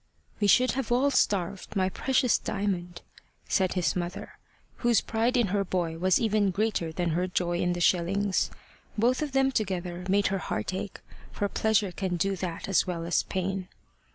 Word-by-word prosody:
"We 205 - +2
should 255 +6 +5
have 260 -3 -3
all 265 +4 +3
starved, 200 -4 0
my 190 -1 +2
precious 255 +5 +1
Diamond," 180 -4 -3 0.4
said 190 -1 +1
his 180 -2 0
mother, 175 0 -5 0.4
whose 240 -3 +3
pride 230 +3 0
in 235 -5 +2
her 200 +1 +1
boy 170 -3 -2
was 185 +1 +3
even 215 -3 +2
greater 190 -4 -1
than 175 +1 -1
her 180 +3 0
joy 175 -1 -1
in 175 0 +1
the 175 - -4
shillings. 190 +3 +2 0.5
Both 245 +6 +2
of 295 -3 -3
them 270 0 +3
together 180 -6 -2
made 200 +1 +3
her 195 - 0
heart 110 +4 -3
ache, 190 +1 -5 0.3
for 205 - -1
pleasure 210 -1 +1
can 185 -1 -2
do 195 +3 0
that 175 -2 -4
as 195 -1 +2
well 170 -2 -3
as 170 - +2
pain. 190 0 -3
190 Hz, 180 wpm, -28 LUFS, 180-215 Hz, 0.5 s, should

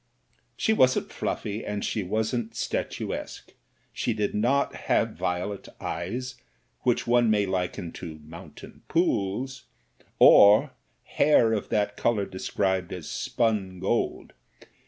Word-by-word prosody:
She 220 - +2
wasn't 130 -11 +3
fluffy, 105 +2 -3
and 105 -1 -3
she 110 - -1
wasn't 110 +4 -2
statuesque; - - -4 0.4
she 120 - -1
did 105 -2 -1
not 125 +7 +1
have - - +2
violet 90 +3 -3
eyes 120 +10 -5 0.4
which 120 -2 0
one 120 -1 +3
may 105 -2 +3
liken 90 -2 -3
to 80 -3 -7
mountain 80 +3 -12
pools, 130 - -1 0.5
or 105 +1 +7 0.3
hair 120 -6 +3
of 105 - -2
that 105 -1 0
colour 110 -4 +1
described 95 -1 -2
as 90 -4 -6
spun 105 -6 -1
gold. 100 +6 -1
105 Hz, 115 wpm, -26 LUFS, 95-120 Hz, 0.5 s, or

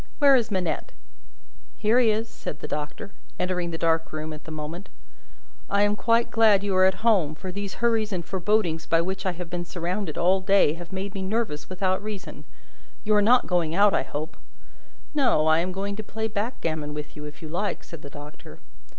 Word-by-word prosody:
Where 280 -2 +6
is 235 -3 +2
Manette?" 190 - -2 0.8
"Here 225 +3 +3
he 240 -3 +4
is," 220 +2 0
said 155 - -7
the - - -6
Doctor, 150 +6 -5 0.3
entering 180 -1 -1
the 165 - -4
dark 165 0 +1
room 155 0 -4
at 155 - -11
the - - -8
moment. 155 +4 -6 0.8
"I 200 0 +3
am 205 0 +2
quite 230 +2 +2
glad 215 -3 +5
you 200 -2 0
are 185 0 +6
at 190 +4 -2
home; 180 -10 +3
for 185 +3 -6
these 200 +1 -5
hurries 225 -2 +1
and 175 -3 -3
forebodings 185 -4 0
by 165 - +3
which 190 +2 -3
I 185 - 0
have 175 0 -6
been 175 0 -2
surrounded 175 0 -3
all 185 +2 +3
day 195 -3 +4
long, 155 - -3
have 175 +1 -9
made 195 +1 -4
me 195 - -4
nervous 190 -6 -2
without 185 0 0
reason. 210 -2 -7 0.6
You 215 - +2
are 210 - +5
not 245 +4 +5
going 170 -3 0
out, 200 +1 +5
I - - +3
hope?" 155 +3 -5 0.8
"No; 255 - +3
I 160 +1 +5
am 180 +2 -1
going 200 +2 -3
to 215 - -4
play 220 +1 -3
backgammon 165 - -3
with 150 0 -7
you, 150 - -7
if 150 +2 -10
you - - -5
like," 190 +6 -2
said 165 -3 -10
the 140 - -9
Doctor. 145 +1 -11
185 Hz, 210 wpm, -25 LUFS, 165-210 Hz, 0.8 s, Where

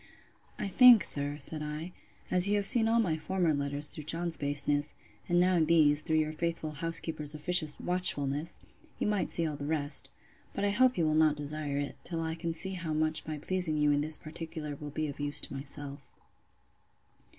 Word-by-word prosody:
I - - -2
think, 240 0 +7
sir, 145 0 +3
said 155 +2 0
I, 150 +3 -5 0.4
as 180 +1 +5
you 205 - +2
have 205 -1 0
seen 225 0 +5
all 230 +1 +2
my 165 -8 0
former 175 -1 0
letters 140 +1 0
through 150 - -9
John's 165 +1 -2
baseness, 145 0 0 0.3
and 175 0 +3
now 180 0 +3
these, 155 -2 +3
through 160 0 0
your 155 0 0
faithful 165 -1 -3
housekeeper's 155 -1 0
officious 155 0 +1
watchfulness, 155 -4 -1 0.4
you - - -2
might 210 -2 -1
see 170 - +1
all 150 -2 -3
the 145 0 -6
rest: 145 -3 0 0.5
But 200 - -1
I 200 - +1
hope 255 +3 +3
you 165 - +1
will 155 - +1
not 155 -1 +3
desire 145 -1 -4
it, 145 0 -4
till 165 -2 -4
I 160 0 -3
can 165 0 -4
see 190 +4 -4
how 165 -4 -4
much 155 0 -1
my 155 -1 -4
pleasing 170 0 0
you 150 0 +2
in 145 0 +1
this 155 +1 -2
particular 155 -1 -7
will 145 +1 -8
be 155 +2 -3
of 140 - -8
use 145 0 -1
to - - -7
myself. 140 +1 -3
155 Hz, 195 wpm, -30 LUFS, 145-175 Hz, 0.5 s, think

